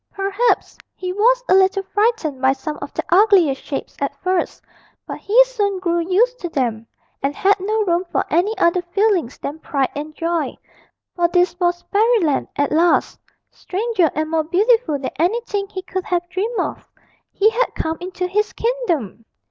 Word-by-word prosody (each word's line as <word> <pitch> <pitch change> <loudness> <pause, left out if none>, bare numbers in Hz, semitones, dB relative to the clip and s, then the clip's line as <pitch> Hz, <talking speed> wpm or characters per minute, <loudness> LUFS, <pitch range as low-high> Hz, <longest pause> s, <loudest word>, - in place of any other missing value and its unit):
Perhaps 395 +4 0 0.2
he 365 -1 -4
was - - +3
a - - +4
little 385 +1 +3
frightened 410 - 0
by 265 0 +4
some 300 +3 -5
of - - -6
the - - -2
ugliest 365 -8 +4
shapes 280 - -6
at 280 0 -2
first, 370 -1 -1 0.4
but - - -7
he 470 +5 +5
soon 410 -6 -1
grew 345 -2 0
used 425 +9 +1
to 350 - -4
them, 230 -7 -2 0.3
and 280 +1 -1
had 400 +1 +3
no 430 +3 0
room 345 -1 +1
for - - 0
any 375 +7 +1
other 340 +1 +2
feelings 355 - 0
than 295 +3 -6
pride 275 -5 -1
and 300 +2 -6
joy. 335 -1 -2 0.6
For 345 -1 +2
this 355 0 +2
was 350 -1 0
Fairyland 415 - +2
at 285 - 0
last, 335 +3 +2 0.3
stranger 390 -3 0
and 310 +1 -2
more 320 -1 +1
beautiful 395 -1 +2
than 270 -1 -5
anything 405 +2 0
he 375 -2 -7
could 375 0 -4
have 350 -1 -1
dreamed 415 +6 -2
of - - -4 0.4
he 430 +2 +3
had - - -1
come 320 0 -2
into 365 0 -4
his 420 +4 -1
kingdom! 350 - -2
365 Hz, 170 wpm, -20 LUFS, 320-415 Hz, 0.6 s, he